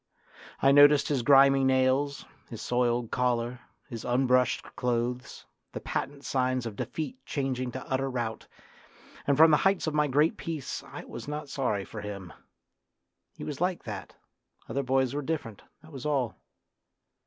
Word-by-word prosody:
I 135 - +6
noticed 145 0 +6
his 140 -4 +1
grimy 135 +1 +6
nails, 130 +2 +2 0.2
his 115 - -7
soiled 120 -1 0
collar, 120 -1 0 0.3
his 115 -6 -7
unbrushed 125 0 +2
clothes, 125 +2 -2 0.3
the - - -4
patent 140 0 -4
signs 130 -1 0
of 110 -3 -5
defeat 250 - -5
changing 130 -3 -2
to 130 - -6
utter 135 +1 -1
rout, 120 -3 -4 0.8
and 140 -1 +3
from 160 +1 +8
the 150 - +6
heights 195 +2 +2
of 155 - -1
my 150 0 +2
great 150 +4 +2
peace 160 -5 -4
I - - -9
was - - -8
not 150 -1 -5
sorry 110 -9 -1
for 105 - -8
him. 100 -5 -7 1.0
He - - -7
was 150 +1 -5
like 180 0 0
that, 105 -4 -7 0.5
other 140 - -1
boys 130 -1 +1
were 145 - -2
different, 140 -8 -4 0.2
that 160 - -15
was 135 0 -5
all. 130 -6 0
130 Hz, 155 wpm, -28 LUFS, 120-145 Hz, 1.0 s, from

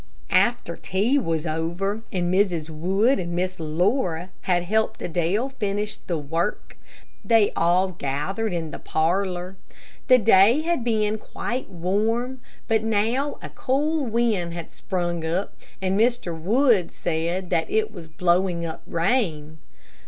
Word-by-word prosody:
After - - +2
tea 220 +10 +1
was 165 - -1
over, 170 +6 -2
and 180 -2 0
Mrs. 175 -5 +1
Wood 195 - +2
and 175 -1 -3
Miss 185 +1 -2
Laura 175 - 0 0.2
had 175 -1 +3
helped 220 +4 0
Adele 175 +9 0
finish 210 -4 -2
the 170 - -3
work, 165 +7 -3 0.5
they 225 -3 +4
all 180 +3 +3
gathered 180 +8 -2
in 165 -3 -3
the - - -7
parlor. 180 +2 -1 0.5
The 255 -2 +8
day 225 +4 +5
had 335 -6 0
been 215 -2 +1
quite 245 +4 -4
warm, 220 +8 -1 0.3
but 220 -1 +2
now 225 +6 0
a - - -6
cool 295 +4 0
wind 215 -7 0
had 170 -2 -7
sprung 175 -3 -3
up, 170 +5 -2 0.3
and 190 +2 +1
Mr. 230 -7 +1
Wood 210 - +2
said 175 +2 -2
that 165 - +1
it 220 0 0
was 170 -5 -9
blowing 175 +1 +1
up 160 - -6
rain. 165 - 0
190 Hz, 135 wpm, -24 LUFS, 170-220 Hz, 0.5 s, The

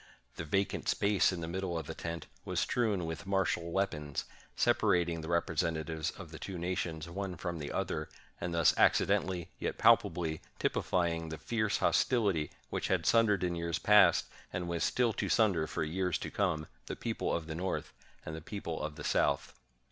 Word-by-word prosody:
The 85 - -5
vacant 95 +6 0
space 100 -2 +3
of 90 -2 -4
the 80 - -3
middle 90 0 -2
of 80 - -4
the - - -5
tent 85 0 -5 0.2
was - - -2
strewn 105 -8 +1
with 80 +2 -5
martial 95 -3 0
weapons, 75 -7 -1 0.3
separating 85 -2 +2
the 80 - -7
representatives 80 -2 0
of - - -9
the - - -8
two 95 -2 -5
nations 85 -2 -2
one 95 +1 -4
from 85 -1 -4
the 75 - -5
other; - - -2 0.3
and 85 - -3
thus 85 -1 +4
accidentally, 90 -3 +3
yet - - -2
palpably, 80 -3 +3 0.2
typifying 85 -2 0
the 80 - -5
fierce 110 +5 0
hostility 100 - +2 0.2
which - - -1
had 90 -3 +1
sundered 105 -3 +4
in 90 -1 +1
years 85 -1 -1
past, 100 -5 +6 0.3
and 90 -1 -3
was 85 0 -1
still 120 -3 +2
to - - -2
sunder 100 -9 +3
for 75 - -2
years 90 +3 0
to - - -6
come, 90 -6 0 0.2
the - - -3
people - - -2
of 85 - -1
the 80 - -5
North 90 +3 -3 0.3
and 80 - -5
the 80 - -7
people 85 -2 -5
of 75 -1 -4
the - - -8
South. - - +1
85 Hz, 180 wpm, -32 LUFS, 80-95 Hz, 0.3 s, past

